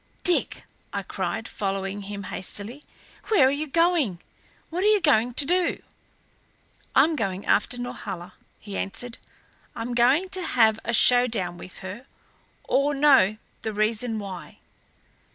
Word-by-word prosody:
"Dick," 360 -2 +2 0.3
I - - -3
cried, - - -4
following 195 0 -3
him 200 0 -7
hastily, 205 +8 -6 0.4
"where 385 -12 +5
are - - +2
you 295 +2 -2
going? 325 - +2 0.5
What 355 +3 -2
are - - +4
you 425 -1 +5
going 245 - +2
to 280 - +4
do?" 355 +3 +1 1.2
"I'm 310 +4 +5
going 195 -6 -3
after 245 +4 +1
Norhala," 190 -7 -6 0.3
he 205 -2 -8
answered. 230 +4 -5 0.6
"I'm 235 +1 -4
going 260 +10 +3
to 375 0 -2
have 225 -9 +3
a 235 - -2
showdown 230 -7 +4
with 185 - -10
her 205 +8 -8 0.6
or 285 +1 +1
know 270 -8 +5 0.2
the 220 - -4
reason 220 +2 0
why." 195 -4 -8
235 Hz, 135 wpm, -25 LUFS, 200-290 Hz, 1.2 s, where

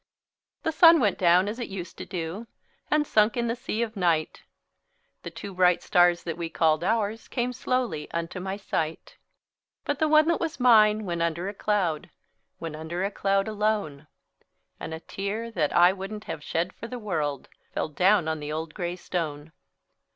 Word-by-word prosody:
The 320 - 0
sun 330 +1 +7
went 210 -6 +1
down 180 +2 +4
as 220 +4 -4
it 240 - -3
used 180 -3 -7
to - - -7
do, 180 +6 -5 0.4
And 300 0 +2
sunk 215 -2 +3
in 235 - 0
the 230 - -1
sea 235 -1 -2
of 225 -1 -5
night; 170 -5 0 0.8
The - - -6
two 200 - -8
bright 180 -1 +3
stars 175 -1 +3
that 170 -1 -5
we 165 -1 -3
called 160 0 +2
ours 220 +2 -1
Came 250 0 -2
slowly 250 - -2
unto 170 +2 -4
my 190 +2 -4
sight; 160 -5 -4 0.7
But - - -1
the 315 - +3
one 310 0 +5
that 340 - +2
was 325 -3 -3
mine 215 -3 +5
went 170 -2 -2
under 170 +2 -1
a 200 - -4
cloud— 195 -7 -1 0.5
Went 165 -2 -5
under 160 +4 -4
a 200 - -1
cloud, 195 0 +1
alone; 210 -9 -1 0.7
And - - -6
a - - -8
tear 210 +6 -4
that 155 -9 0
I 175 +2 +6
wouldn't 200 +2 -7
have 150 - -6
shed 170 +4 -2
for 230 - -8
the 250 - -6
world, 155 - -3 0.2
Fell - - -2
down 185 +3 +3
on 160 -1 -1
the 150 0 -5
old 155 0 -4
gray 175 -1 -3
stone. 160 -4 -4
190 Hz, 185 wpm, -26 LUFS, 165-220 Hz, 0.8 s, sun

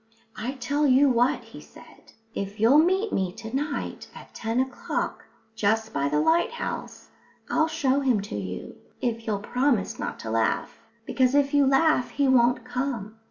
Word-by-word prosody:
"I 235 +5 -4
tell 280 +3 0
you 270 +2 +5
what," 245 +1 +2
he - - -12
said. - - -17 0.2
"If 200 +2 -5
you'll 240 +7 +6
meet 380 +6 +2
me 190 -2 0
to 225 +3 -7
night 290 +1 -3
at - - -13
ten 225 +2 -2
o'clock 260 0 -3 0.3
just 220 +1 0
by 140 0 0
the 150 +1 +1
lighthouse 345 - -1 0.4
I'll 315 - +3
show 285 -4 +1
him 255 -6 +2
to 205 - -6
you, 95 -3 -6 0.2
if 230 -2 -3
you'll 210 -2 0
promise 245 +1 0
not - - -4
to 110 - -5
laugh. 115 0 0 0.3
Because 260 +1 +2
if 285 0 +2
you 285 -2 +4
laugh, 270 -1 +3
he 280 -1 0
won't 245 -1 +3
come." 245 -4 -4
250 Hz, 165 wpm, -26 LUFS, 220-280 Hz, 0.4 s, you'll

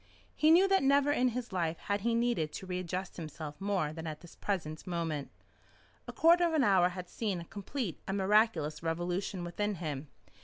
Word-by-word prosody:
He 305 - +4
knew 355 +4 +7
that 390 0 +4
never 280 +1 +4
in 255 -3 +3
his 245 -2 -3
life 170 -3 0
had 200 0 -2
he 230 +2 +1
needed 230 -10 +1
to - - -6
readjust 180 0 -4
himself 155 -2 -7
more 195 -7 0
than 160 0 -6
at 155 -1 -6
the 175 - -14
present 160 -6 -3
moment. 165 -5 -2 0.8
A - - -4
quarter 340 +2 +5
of 330 - -2
an 295 - +4
hour 190 -5 +5
had 180 0 -7
seen 200 -4 -2
a 170 - -8
complete 200 - -4
and 195 +1 -1
miraculous 190 -7 +2
revolution 175 +3 -2
within 205 +4 -2
him. 155 -4 -4
185 Hz, 190 wpm, -32 LUFS, 165-230 Hz, 0.8 s, knew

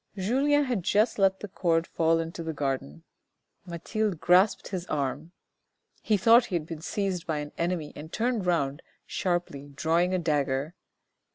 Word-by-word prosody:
Julien 275 +9 +2
had 245 -7 -1
just 210 +6 +2
let 190 -1 +3
the 210 - -5
cord 170 -3 0
fall 165 0 +1
into 165 +1 -4
the 160 -1 -4
garden; 130 - -3 0.6
Mathilde 180 +2 -2
grasped 185 +5 +3
his 185 -2 -4
arm. 145 +3 -3 0.7
He 215 - +2
thought 230 +5 +6
he 180 - -4
had 160 -3 -1
been 160 -1 -7
seized 190 -1 -2
by 160 -2 -1
an 150 0 -5
enemy 170 -3 -2
and 155 +2 -9
turned 230 -4 -1
round 145 -5 0 0.2
sharply, 175 -6 -2
drawing 170 +4 +1
a - - +2
dagger. 145 -2 -1
170 Hz, 160 wpm, -27 LUFS, 155-195 Hz, 0.7 s, thought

